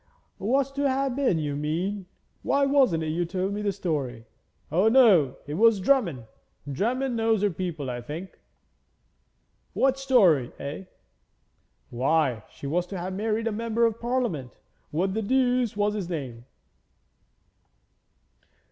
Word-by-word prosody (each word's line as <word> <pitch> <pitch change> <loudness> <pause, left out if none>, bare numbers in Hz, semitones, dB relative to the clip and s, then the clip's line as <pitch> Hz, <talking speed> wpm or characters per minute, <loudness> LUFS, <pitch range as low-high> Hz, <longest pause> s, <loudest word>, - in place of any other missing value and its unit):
'Was 270 +6 +1
to 280 0 0
have 265 -1 0
been, 260 -11 +1
you 145 -2 -2
mean. 180 +7 -2 0.3
Why, 280 0 +2
wasn't 265 - +3
it 155 - -2
you 170 +3 0
told 185 +3 -2
me 210 - -3
the 205 -1 0
story? 145 - -3 0.5
O 185 +7 +3
no, 210 - +5
it 145 - -6
was 220 +4 +4
Drummond. 185 - +1 0.4
Drummond 240 - -1
knows 225 -2 +1
her 205 - +2
people, 165 -5 -4
I 120 -1 -4
think.' 160 +9 -8 1.3
'What 270 0 +2
story, 190 - +3
eh?' 145 +7 -6 1.1
'Why, 130 -1 +1
she - - -12
was 175 +5 -1
to 195 - -6
have 180 +2 -4
married 215 +3 -1
a 225 - 0
Member 230 +2 0
of 230 0 -1
Parliament; 235 - -2 0.3
what 185 +5 -1
the 220 - -1
deuce 250 -1 +1
was 205 0 +1
his 200 -5 -4
name? 130 -8 -5
195 Hz, 140 wpm, -26 LUFS, 155-235 Hz, 1.3 s, no